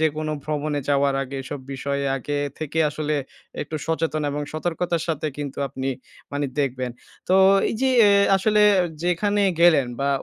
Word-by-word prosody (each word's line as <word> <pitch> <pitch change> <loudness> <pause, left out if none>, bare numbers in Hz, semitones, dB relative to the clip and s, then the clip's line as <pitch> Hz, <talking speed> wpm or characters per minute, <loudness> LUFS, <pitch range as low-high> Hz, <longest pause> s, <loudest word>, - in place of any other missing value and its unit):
যেকোনো 155 0 0
ভ্রমণে 150 -1 -2
যাওয়ার 140 -1 +2
আগে 135 +1 -6
এসব 140 +1 -6
বিষয়ে 140 +1 -2
আগে 145 +3 -4 0.2
থেকে 155 +1 -4
আসলে 150 0 -2 0.5
একটু 155 +2 -5
সচেতন 160 -1 -1
এবং 145 +1 -3
সতর্কতার 170 +1 -2
সাথে 155 -1 -1
কিন্তু 140 -2 -5
আপনি 135 0 -4 0.4
মানে 145 0 -1
দেখবেন। 130 -3 -1 0.4
তো 185 - +4 0.4
এইযে 245 +4 -1 0.2
এ - - +5 0.3
আসলে 210 +2 +2 0.2
আ - - 0 0.2
যেখানে 205 +4 +1 0.2
গেলেন 160 -6 +5
বা 140 - +1
150 Hz, 155 wpm, -23 LUFS, 140-165 Hz, 0.5 s, এ